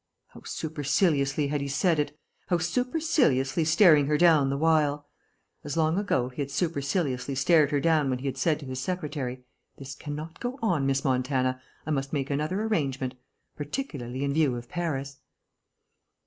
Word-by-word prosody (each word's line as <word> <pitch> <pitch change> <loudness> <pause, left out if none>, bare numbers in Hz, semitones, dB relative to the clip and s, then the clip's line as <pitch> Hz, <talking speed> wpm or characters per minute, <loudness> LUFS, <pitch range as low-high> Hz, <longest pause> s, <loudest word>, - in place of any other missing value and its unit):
How - - -14
superciliously 150 -2 0
had 145 0 -1
he 140 - -3
said 160 +3 +1
it, 145 0 -2 0.3
how 175 - +2
superciliously 180 - +1
staring 155 -3 +5
her 150 0 +2
down 155 -5 +5
the 140 - -1
while. 150 -2 +2 0.6
As, 145 +2 -4
long 160 +3 +2
ago, 130 -11 0
he 130 +3 -6
had 140 - -3
superciliously 140 -3 -1
stared 150 +2 +4
her 145 -1 +1
down 155 -2 +2
when 130 - 0
he 130 - -9
had 135 -2 -2
said 150 +4 +1
to - - -8
his 130 -1 -5
secretary, 145 -7 -4 0.3
"This 135 -1 -8
cannot 150 +3 -7
go 245 +2 -4
on, 170 -11 +1
Miss 135 0 0
Montana. 130 0 0 0.2
I 155 - -3
must 135 -1 -2
make 140 -1 -1
another 155 +9 -1
arrangement. 135 -12 -1 0.4
Particularly 145 - -4
in 140 0 0
view 145 -5 +2
of 120 0 -7
Paris...." 140 -6 -3
145 Hz, 165 wpm, -27 LUFS, 135-165 Hz, 0.6 s, staring